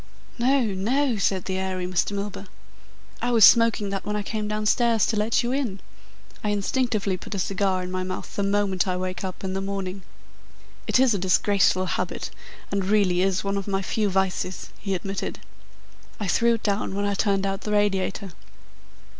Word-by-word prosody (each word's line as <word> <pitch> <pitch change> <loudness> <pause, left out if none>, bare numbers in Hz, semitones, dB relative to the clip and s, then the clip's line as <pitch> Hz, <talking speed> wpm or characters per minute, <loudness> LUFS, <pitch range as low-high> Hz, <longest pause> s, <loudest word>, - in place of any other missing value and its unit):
"No, 260 +2 +3
no," 230 +5 0
said 190 -2 0
the 190 -1 -2
airy 185 -1 -2
Mr. 180 +2 0
Milburgh. 200 0 -5 0.7
"I 245 - 0
was 230 -4 +7
smoking 230 -3 +5
that 195 -1 -3
when 210 - -3
I 210 - -1
came 215 +1 -3
downstairs 215 +1 +2
to 225 - 0
let 215 +3 +1
you 240 - -1
in. 255 -8 -1 0.6
I 210 - 0
instinctively 205 -1 0
put 200 - -7
a - - -2
cigar 190 0 0
in 180 - -6
my 185 0 -2
mouth 185 0 -5
the - - -1
moment 200 -2 +1
I 180 -1 0
wake 185 +1 -4
up 185 0 -6
in 190 -1 -2
the 195 - -2
morning. 195 -1 -4 0.9
It - - +3
is 260 -3 +5
a 200 - -1
disgraceful 190 0 +3
habit, - - -3 0.4
and 200 -1 0
really 195 -3 +3
is 190 -1 +1
one 200 0 -1
of 195 - -4
my 195 -1 -1
few 210 +1 0
vices," 190 -1 -1
he 195 -2 -2
admitted. 195 +2 -4 0.8
"I 210 - -2
threw 235 +5 +3
it 225 - -8
down 200 -2 -1
when 200 0 -1
I 200 - 0
turned 195 -1 +1
out 195 +1 -2
the 210 - -4
radiator." 200 -2 0
200 Hz, 190 wpm, -25 LUFS, 190-215 Hz, 0.9 s, was